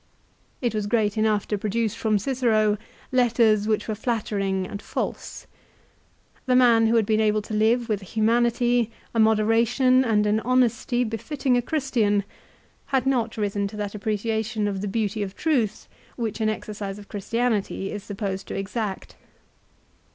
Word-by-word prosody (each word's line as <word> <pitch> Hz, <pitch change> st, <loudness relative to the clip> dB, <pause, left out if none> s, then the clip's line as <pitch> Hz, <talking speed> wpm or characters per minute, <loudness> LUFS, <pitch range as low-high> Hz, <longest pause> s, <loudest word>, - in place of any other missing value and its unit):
1 245 Hz, -, +1 dB
It -, -, -9 dB
was 210 Hz, -1 st, -2 dB
great 210 Hz, -2 st, +1 dB
enough 215 Hz, -2 st, +1 dB
to 210 Hz, -, -1 dB
produce 215 Hz, +1 st, -1 dB
from 220 Hz, -2 st, +1 dB
Cicero 215 Hz, -3 st, +1 dB, 0.3 s
letters 230 Hz, -4 st, +3 dB
which 215 Hz, -1 st, 0 dB
were 220 Hz, -, -1 dB
flattering 205 Hz, -4 st, -1 dB
and 200 Hz, +2 st, -7 dB
false. -, -, -5 dB, 1.0 s
The 255 Hz, -, +3 dB
man 235 Hz, -3 st, +5 dB
who 230 Hz, -, +2 dB
had 225 Hz, -2 st, +3 dB
been 215 Hz, +1 st, +2 dB
able 215 Hz, -1 st, +2 dB
to 215 Hz, -, -7 dB
live 225 Hz, +3 st, +2 dB
with 210 Hz, -3 st, -1 dB
a -, -, -10 dB
humanity, 235 Hz, +2 st, +2 dB, 0.2 s
a 230 Hz, -, 0 dB
moderation, 230 Hz, +4 st, +3 dB
and 215 Hz, -4 st, +2 dB
an 210 Hz, +1 st, +2 dB
honesty 245 Hz, 0 st, +1 dB
befitting 245 Hz, +4 st, -1 dB
a 245 Hz, -, +3 dB
Christian, 235 Hz, -8 st, 0 dB, 0.6 s
had 265 Hz, -2 st, +1 dB
not 240 Hz, -4 st, 0 dB
risen 205 Hz, -1 st, -1 dB
to 210 Hz, -, -9 dB
that 205 Hz, -1 st, -4 dB
appreciation 220 Hz, +1 st, -1 dB
of 195 Hz, -2 st, -3 dB
the 205 Hz, -, -3 dB
beauty 210 Hz, +1 st, -1 dB
of 195 Hz, -1 st, -4 dB
truth 250 Hz, -10 st, 0 dB, 0.3 s
which 225 Hz, -2 st, -3 dB
an 215 Hz, -, +2 dB
exercise 205 Hz, -2 st, -5 dB
of 205 Hz, -1 st, -12 dB
Christianity 210 Hz, -2 st, -1 dB
is 205 Hz, -1 st, -6 dB
supposed 195 Hz, -2 st, -4 dB
to -, -, -5 dB
exact. 200 Hz, 0 st, -4 dB
220 Hz, 160 wpm, -24 LUFS, 205-235 Hz, 1.0 s, man